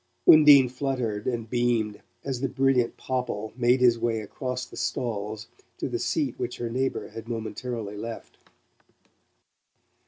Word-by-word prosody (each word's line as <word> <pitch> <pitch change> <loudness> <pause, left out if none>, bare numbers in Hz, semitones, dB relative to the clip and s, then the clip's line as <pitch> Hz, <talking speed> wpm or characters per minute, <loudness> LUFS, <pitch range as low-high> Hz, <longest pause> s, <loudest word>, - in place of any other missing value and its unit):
Undine 145 -4 +9
fluttered 125 -5 -3
and 120 -3 -2
beamed 120 -3 0 0.2
as 130 -3 -3
the 135 - 0
brilliant 130 -2 +1
Popple 125 -5 -3
made 125 +1 +3
his 120 -2 +5
way 115 -1 0
across 125 +4 -4
the - - -14
stalls 110 -2 -3 0.3
to - - -2
the - - -3
seat - - -1
which - - -3
her 120 -1 -4
neighbour 130 +2 -2
had 115 +1 -9
momentarily 115 -1 -4
left. 115 +2 -8
120 Hz, 135 wpm, -26 LUFS, 110-130 Hz, 0.3 s, Undine